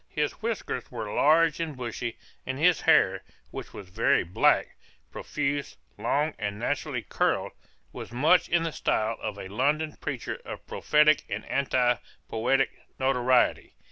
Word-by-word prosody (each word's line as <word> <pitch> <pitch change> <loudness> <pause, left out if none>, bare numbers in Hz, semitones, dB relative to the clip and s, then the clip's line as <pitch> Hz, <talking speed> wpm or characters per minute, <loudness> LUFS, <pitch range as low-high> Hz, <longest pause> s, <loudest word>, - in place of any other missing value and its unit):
His 150 -1 -1
whiskers 220 - -3
were 110 -4 -5
large 160 +1 +4
and 160 -5 -3
bushy, 120 -1 -4 0.3
and 130 0 -4
his 170 +2 +3
hair, - - +4 0.3
which - - -7
was 100 - -10
very 110 +5 +2
black, 90 +2 +2 0.4
profuse, 145 -1 -3 0.2
long 150 +2 0
and 100 -1 -3
naturally - - -2
curled, - - 0 0.4
was - - -8
much 160 +8 +3
in 170 0 +2
the 165 - -2
style 110 -4 0
of 105 -2 -4
a 95 - -7
London 145 +9 0
preacher 130 -6 -4
of - - -8
prophetic 150 0 +3
and - - -4
anti 125 -3 +1 0.3
poetic 130 +4 +1 0.3
notoriety. 130 -1 +2
135 Hz, 140 wpm, -27 LUFS, 120-155 Hz, 0.4 s, large